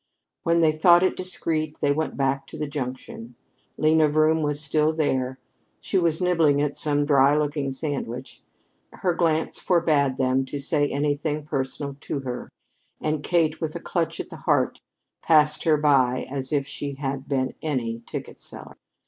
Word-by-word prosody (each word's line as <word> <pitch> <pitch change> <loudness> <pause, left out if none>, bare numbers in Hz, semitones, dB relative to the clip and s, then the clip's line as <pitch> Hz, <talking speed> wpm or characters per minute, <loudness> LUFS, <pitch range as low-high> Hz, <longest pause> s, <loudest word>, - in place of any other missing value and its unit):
When 170 0 +2
they 160 -1 +5
thought 170 +3 +5
it 185 - +2
discreet, 160 -4 -2
they 145 - +2
went 155 +2 -2
back 135 0 0
to - - -9
the 150 - -2
junction. 130 -4 -6 0.4
Lena 155 0 +4
Vroom 155 +1 +3
was 150 -1 -1
still 155 +1 +1
there. 130 -4 0 0.4
She 195 - 0
was 165 -3 +1
nibbling 165 -5 +3
at 145 -1 0
some 145 -1 0
dry 140 0 +4
looking 145 -2 -1
sandwiches. 135 -3 -5 0.5
Her 180 -2 0
glance 160 -2 0
forbade 155 -7 +2
them 130 0 +2
to 140 +2 -5
say 145 0 0
anything 145 +1 -1
personal 140 -1 -3
to 140 -1 -4
her, 125 -2 -5 0.5
and 155 -1 -1
Kate, 160 -1 +1
with 160 -1 -3
a - - -3
clutch 165 -1 -2
at - - -6
the - - -8
heart, - - 0 0.4
passed 150 -1 +3
her 155 -2 +4
by 135 -4 +2
as 135 -1 -3
if 145 -2 +1
she 140 0 -5
had 135 -1 -4
been 130 -2 -1
any 120 -7 -2
ticket - - -7
seller. - - -11
150 Hz, 165 wpm, -24 LUFS, 135-155 Hz, 0.5 s, they